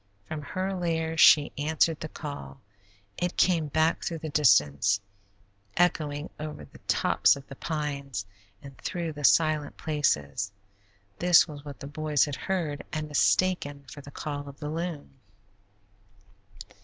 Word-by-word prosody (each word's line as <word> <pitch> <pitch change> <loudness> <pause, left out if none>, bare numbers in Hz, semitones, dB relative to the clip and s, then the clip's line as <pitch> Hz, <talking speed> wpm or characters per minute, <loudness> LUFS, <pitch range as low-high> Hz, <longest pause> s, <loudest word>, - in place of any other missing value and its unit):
From 155 -1 -5
her 185 +6 -3
lair 165 -3 -1
she 150 -2 +7
answered 160 +1 +1
the 155 - -6
call; 140 - -8 0.6
it 175 0 -2
came 170 -4 +3
back 155 +3 +1
through 165 - -2
the 155 0 -6
distance, 100 - +4 0.8
echoing 155 -3 +1
over 150 0 -6
the - - -17
tops - - +3
of 140 -1 -11
the 135 - -10
pines, 140 -8 -4 0.4
and 140 -1 -11
through 170 -3 -3
the 145 0 -8
silent 155 0 +3
places. 100 - 0 0.7
This 175 -1 +6
was 145 -3 -9
what 145 -2 -9
the - - -6
boys 150 0 +1
had 145 -2 -4
heard 165 -6 -2
and 155 0 -3
mistaken 145 -2 +1
for 145 - -9
the 140 - -12
call 145 0 -5
of 140 - -12
the 150 -1 -4
loon. 160 -4 -5
150 Hz, 145 wpm, -28 LUFS, 140-160 Hz, 0.8 s, she